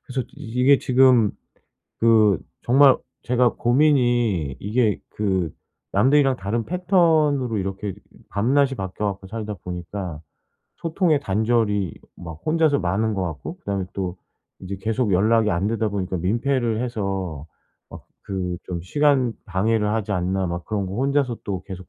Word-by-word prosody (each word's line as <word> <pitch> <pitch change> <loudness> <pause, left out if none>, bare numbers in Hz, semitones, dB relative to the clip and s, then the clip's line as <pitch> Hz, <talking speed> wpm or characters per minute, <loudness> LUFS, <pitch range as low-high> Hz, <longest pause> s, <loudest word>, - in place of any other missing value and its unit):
그래서 130 0 -3
이게 125 +4 +2
지금 125 -4 +4 0.7
그 110 -5 +4 0.2
정말 135 +2 +6 0.3
제가 125 -1 +2
고민이 120 - +2
이게 110 +1 +1
그 95 -5 -1 0.4
남들이랑 135 -1 +4
다른 105 +4 -2
패턴으로 160 - +2
이렇게 95 +1 -3 0.2
이 - - -20
밤낮이 135 +6 +2
바뀌어 95 -1 -4
갖고 100 -1 -4
살다 105 +1 -5
보니까 90 -2 -6 0.6
소통의 165 -2 +1
단절이 105 - 0 0.2
막 80 -2 -9
혼자서 155 -2 +3
많은 100 +5 0
것 95 - -1
같고 80 -6 -6
그다음에 100 -2 -3
또 95 -2 -3 0.4
이제 95 +1 -6
계속 110 +2 -1
연락이 105 +3 +3
안 90 +3 0
되다 115 -1 0
보니까 95 -2 -3
민폐를 115 +4 0
해서 95 - -3 0.4
막 - - -11 0.2
그 90 -2 -3
좀 90 -2 -4
'시간 135 - +2
방해를 105 +2 +1
하지 110 -2 -2
않나?' 95 0 0
막 85 0 -4
그런 100 -3 -2
거 95 - -6
혼자서 135 -2 0
또 95 -2 -3
계속 95 -3 -9
110 Hz, 290 characters per minute, -23 LUFS, 95-125 Hz, 0.7 s, 정말